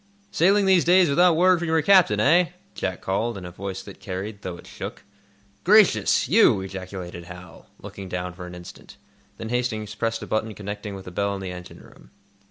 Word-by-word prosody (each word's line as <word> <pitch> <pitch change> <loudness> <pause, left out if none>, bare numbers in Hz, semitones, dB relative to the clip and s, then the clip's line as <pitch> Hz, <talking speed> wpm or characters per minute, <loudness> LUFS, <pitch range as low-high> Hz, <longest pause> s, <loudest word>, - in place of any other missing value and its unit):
"Sailing 195 +4 +3
these 190 -3 +4
days 180 -1 +5
without 175 +4 +4
word 180 +1 +4
from 170 - -3
your 160 0 +2
captain, 180 - +5
eh?" 170 +8 +3 0.2
Jack 95 -1 -4
called, 110 +4 -2
in 90 - -8
a 90 - -8
voice 95 +1 -6
that - - -12
carried, 100 +2 -6
though 90 -3 -6
it - - -14
shook. - - -8 0.6
"Gracious—you?" 180 - +4
ejaculated 95 -2 -7
Hal, 90 +1 -12
looking 95 -1 -9
down 90 0 -4
for 90 0 -9
an 90 - -9
instant. 90 0 -12 0.4
Then 110 - -6
Hastings 110 -4 -2
pressed 115 +1 -2
a - - -5
button 110 0 -2
connecting 105 +1 -6
with 95 - -10
a 90 - -8
bell 100 +2 -1
in - - -6
the 95 -1 -5
engine 90 -1 -10
room. - - -18
105 Hz, 190 wpm, -24 LUFS, -, 0.6 s, days